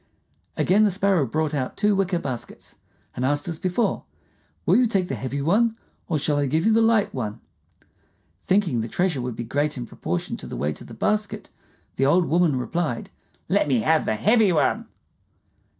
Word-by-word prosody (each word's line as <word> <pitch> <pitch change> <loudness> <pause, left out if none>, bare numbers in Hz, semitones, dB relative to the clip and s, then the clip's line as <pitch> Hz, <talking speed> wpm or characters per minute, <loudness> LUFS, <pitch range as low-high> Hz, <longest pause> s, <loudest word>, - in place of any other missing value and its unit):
Again 205 +4 +3
the 210 - +4
Sparrow 195 -6 +1
brought 155 +4 -1
out 130 -3 -3
two 210 -1 +2
wicker 190 -2 +1
baskets, 130 -7 -7 0.4
and 125 - -3
asked 145 +4 0
as 165 -2 -4
before, 185 +6 0 0.6
"Will - - +4
you 250 -1 +4
take 195 -4 0
the - - -2
heavy 140 +2 -4
one, 225 +8 +2 0.3
or 160 - +1
shall 145 0 0
I 145 -1 +1
give 160 +5 0
you 220 - +4
the 225 - +4
light 225 -2 +3
one?" 110 -3 -4 1.0
Thinking 185 - +1
the 110 - -3
treasure 165 +2 0
would 125 -1 -4
be 120 - -4
great 145 +5 -1
in 120 - -4
proportion 85 -6 -4
to - - -10
the - - -6
weight 75 +1 -2
of - - -11
the - - -10
basket, 210 -1 -2 0.5
the 135 - +3
old 175 +4 +4
woman 170 -3 +2
replied, 125 +1 -2 0.4
"Let - - +2
me 130 -5 +2
have 160 +5 +2
the 110 - 0
heavy 215 - +3
one." 150 -5 +1
160 Hz, 190 wpm, -24 LUFS, 130-195 Hz, 1.0 s, the